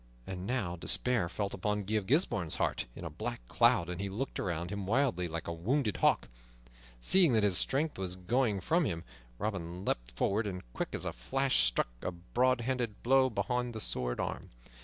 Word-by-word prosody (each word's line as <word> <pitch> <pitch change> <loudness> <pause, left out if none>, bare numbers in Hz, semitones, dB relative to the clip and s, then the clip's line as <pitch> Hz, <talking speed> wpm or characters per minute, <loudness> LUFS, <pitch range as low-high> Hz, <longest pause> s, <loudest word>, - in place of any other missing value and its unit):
And 95 0 -5
now 105 -9 -1
despair 115 +1 +2
fell 100 +2 -2
upon 105 +2 -1
Guy 105 +3 -4
of 105 -3 0
Gisbourne's 115 - +2
heart - - -1
in 90 - -7
a - - -3
black 115 +9 -5
cloud, 120 -8 +4
and 90 +1 -4
he 100 - -2
looked 120 +8 -3
around 85 -1 -2
him 100 -2 -4
wildly, 115 -7 +2
like 85 +1 -5
a 85 - -2
wounded 110 - 0
hawk. - - +3 0.7
Seeing 175 - +5
that 110 -2 +3
his 100 -4 +3
strength 145 -2 0
was 90 -1 -1
going 105 +2 +1
from 165 - +2
him, 85 -8 -2 0.3
Robin 90 - -4
leaped - - -1
forward, 105 - +1
and, 90 -2 -5
quick - - -3
as - - -3
a - - -2
flash, 130 - +2
struck - - 0
a - - -2
back 120 +9 +1
handed 120 -3 -2
blow 130 +1 +5
beneath 120 +3 -1
the 110 - -5
sword 60 -10 -1
arm. - - -3
105 Hz, 195 wpm, -32 LUFS, 90-125 Hz, 0.7 s, Seeing